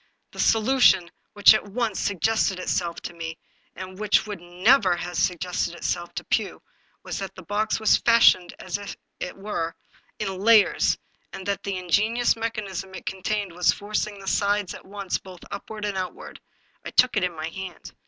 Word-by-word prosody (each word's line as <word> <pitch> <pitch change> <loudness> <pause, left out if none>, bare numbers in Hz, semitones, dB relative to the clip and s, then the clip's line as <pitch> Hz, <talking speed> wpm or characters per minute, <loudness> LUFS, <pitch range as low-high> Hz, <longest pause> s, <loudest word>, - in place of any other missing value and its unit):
The - - -12
solution 225 -6 +4 0.2
which 205 0 +8
at 215 - 0
once 220 -1 -2
suggested 200 0 +1
itself 175 -2 -2
to - - -6
me 165 -1 -6 0.2
— - - -39
^and 185 +1 -8
which 210 0 +3
would 205 -4 -6
never 185 +3 +3
have 175 0 -5
sug 180 +1 +1
gested 175 -1 -2
itself 175 0 -3
to - - -4
Pugh! - - -1 0.2
— - - -39
was - - -4
that 195 -1 -6
the 185 - -10
box 210 +6 -1
was 220 - +5
fashioned, 230 -6 +4
as 185 +2 -4 0.4
it 180 - -5
were, 195 -5 -3 0.4
in 190 -1 -3
layers, 215 0 +4 0.4
and 190 -1 -7
that 200 -1 -1
the 195 -2 -3
ingenious 215 +7 +2
mechanism 200 -5 -4
it - - -9
contained 200 +1 -2
was 175 +1 +3
forcing 210 0 -3
the 195 - -11
sides 205 -1 +1
at - - -11
once 200 -1 -3
both 185 -2 -13
upward 215 -1 -6
and 205 -1 -2
outward. 185 -1 -7 0.4
I - - -5
took 250 -1 +4
it 205 - +1
in 180 -2 -1
my 155 +1 -4
hand. 185 -1 -8
195 Hz, 185 wpm, -25 LUFS, 180-215 Hz, 0.4 s, which